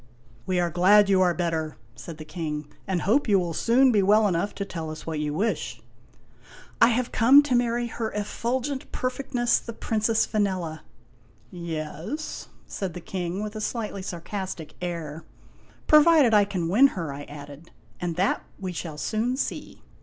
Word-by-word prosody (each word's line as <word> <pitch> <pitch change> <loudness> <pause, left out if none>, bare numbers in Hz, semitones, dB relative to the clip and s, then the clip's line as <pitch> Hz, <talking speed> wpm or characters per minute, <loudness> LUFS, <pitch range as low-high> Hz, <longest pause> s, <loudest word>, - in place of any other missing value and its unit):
" 120 - -28
We 185 -1 +1
are 175 -1 0
glad 200 +4 +5
you 190 -1 +4
are 180 -2 +3
better," 160 -3 -2 0.2
said 150 +7 -9
the 155 - -9
King, 150 -2 -4
" - - -31
and 190 -2 -1
hope 245 +9 +2
you 205 -2 +5
will 175 -3 -1
soon 250 +9 +4
be 210 -3 +3
well 210 +2 +4
enough 185 +2 -1
to 200 - -3
tell 165 -4 -5
us 155 0 -8
what 160 -2 -3
you 150 0 -1
wish." 205 +9 -2 0.5
" - - -22
I - - +9
have 245 +1 0
come 265 +6 +7
to 290 -3 -1
marry 240 0 +1
Her 230 -1 -4
Effulgent 245 +6 -3
Perfectness 255 -2 0
the 230 - -8
Princess 225 0 +1
Vanella! 185 -7 -1 0.3
" 120 -1 -32 0.2
" - - -32
Yes? 170 - -5
" - - -30
said 190 -4 -5
the - - -5
King, 180 +2 -4
with 210 +1 -6
a 215 - -4
slightly 215 -3 -3
sarcastic 185 -2 -6
air. 165 -3 -5 0.3
" - - -29
Provided 305 -5 +6
I 205 -1 +6
can 185 -4 -2
win 230 +11 +6
her," 160 -5 -3
I 145 +1 -8
added. 145 +2 -11 0.2
" - - -31
And 175 -2 -2
that 190 +4 +1 0.2
we 190 -2 -4
shall 160 -2 -6
soon 230 +9 -1
see." - - -4
190 Hz, 190 wpm, -25 LUFS, 165-230 Hz, 0.5 s, I